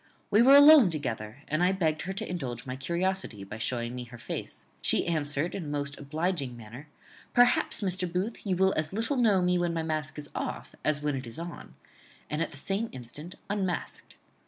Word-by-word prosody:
We 210 - +6
were 270 +3 +8
alone 285 -6 +9
together, 125 -5 -4
and 155 +2 0
I 180 +2 +4
begged 160 -5 0
her 190 - -4
to 215 +3 -4
indulge 130 -8 -4
my 130 -1 -4
curiosity 170 - -2
by 105 +3 -8
showing 120 0 -2
me 125 -1 -5
her 120 0 -11
face. - - -6 0.2
She - - +3
answered 155 -1 -1
in 185 - -4
a - - -6
most 145 -1 -3
obliging 145 -3 -2
manner, 120 +6 -10 0.5
'Perhaps, 245 -1 +4
Mr. 185 -2 -1
Booth, 190 +6 -2
you 190 -3 0
will 190 +1 +3
as 155 +2 -1
little 230 +7 0
know 210 -7 +4
me 180 0 +2
when 175 -1 0
my 165 - -1
mask 155 -3 -3
is 145 -2 -6
off - - -4
as 150 -1 0
when 150 -2 0
it 130 -2 -5
is 115 - -5
on;' 170 +1 -8 0.6
and 150 +2 -1
at - - 0
the - - -10
same 195 +9 -2
instant 145 +8 -9
unmasked. 195 -3 -3
160 Hz, 205 wpm, -29 LUFS, 135-190 Hz, 0.6 s, alone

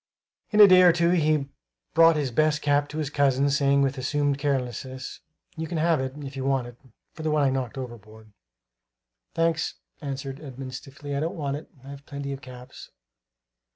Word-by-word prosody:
In 210 - +1
a 205 - +11
day 185 -1 +7
or 180 -1 +8
two 170 0 +2
he 155 -5 +2 0.5
brought 165 0 +6
his 145 -4 -1
best 150 +4 +1
cap 145 0 +2
to 150 - -7
his 150 -2 -2
cousin, 140 -1 +2
saying 140 0 +3
with 135 0 -1
assumed 145 +1 0
carelessness: 130 -2 -3 0.4
"You 160 -1 -4
can 170 - -3
have 160 -2 +2
it, 130 0 -4
if 135 0 -7
you 135 - -4
want 135 -2 +1
it, 120 -1 -10 0.4
for - - -9
the 155 - -1
one 150 -1 +2
I 135 - +3
knocked 130 -2 -3
overboard." 110 -4 -10 1.0
"Thanks," 165 -1 0 0.3
answered 135 -1 -5
Edmund 130 -2 -8
stiffly; 140 +2 -7
"I - - 0
don't 165 +6 -2
want 140 -2 -2
it; 155 - -12 0.2
I've 140 0 -10
plenty 140 -1 -5
of 135 - -8
caps." 125 -1 -12
140 Hz, 190 wpm, -26 LUFS, 130-155 Hz, 1.0 s, a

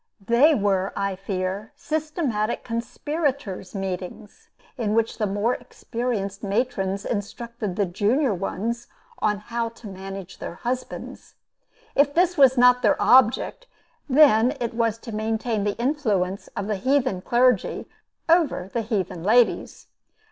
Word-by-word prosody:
They 270 +8 +5
were, 195 -3 0
I 200 -1 -1
fear, 195 +2 -4
systematic 305 - -2
conspirators' 240 - -3
meetings, 190 +1 -6 0.3
in 220 -4 -1
which 230 0 0
the 215 - +1
more 205 +5 0
experienced 225 -7 -4
matrons 200 -2 -1
instructed 220 -1 -4
the 205 - +1
junior 215 - +1
ones 220 +5 -3 0.3
how 220 +3 -1
to 230 -1 -13
manage 195 -1 -8
their - - -6
husbands. 250 +4 -5 0.6
If 285 0 +3
this 355 +1 +3
was 270 -4 +5
not 250 0 +6
their 215 -4 +3
object, 260 - +4 0.4
then 260 -2 +5
it 235 -1 -2
was 230 -1 0
to 230 0 -9
maintain 220 0 -1
the 205 - -1
influence 215 -8 -1
of 200 - -2
the 210 -1 -1
heathen 255 -3 +1
clergy 245 0 +2 0.4
over 320 - +2
the 235 - 0
heathen 195 -6 -2
ladies. 230 +4 +2
225 Hz, 125 wpm, -24 LUFS, 195-250 Hz, 0.6 s, not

